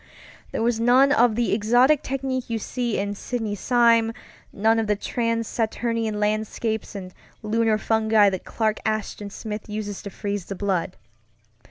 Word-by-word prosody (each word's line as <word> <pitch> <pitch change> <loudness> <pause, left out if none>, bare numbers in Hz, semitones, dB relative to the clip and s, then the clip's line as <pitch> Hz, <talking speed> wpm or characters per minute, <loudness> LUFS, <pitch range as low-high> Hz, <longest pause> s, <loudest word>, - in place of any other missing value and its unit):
There - - -2
was 235 -1 +1
none 255 +4 +5
of 240 -5 +4
the 240 0 +1
exotic 245 +7 +4
technique 260 -2 -3
you 230 - -1
see 240 +1 -2
in 200 +1 -2
Sidney 220 0 -3
Sime, 230 +1 +3 0.4
none 225 +2 +2
of 220 - -1
the 210 - +2
trans 230 +1 -1
Saturnian 225 -1 -1
landscapes 215 +1 -2
and 185 -2 -7 0.3
lunar 220 0 +2
fungi 220 -2 +3
that 185 - -4
Clark 215 -1 -1
Ashton 215 -1 -3
Smith 210 +1 -7
uses 210 -1 -4
to 200 - -7
freeze 200 -1 -4
the 195 - -6
blood. 185 -2 -2
220 Hz, 155 wpm, -24 LUFS, 210-235 Hz, 0.4 s, none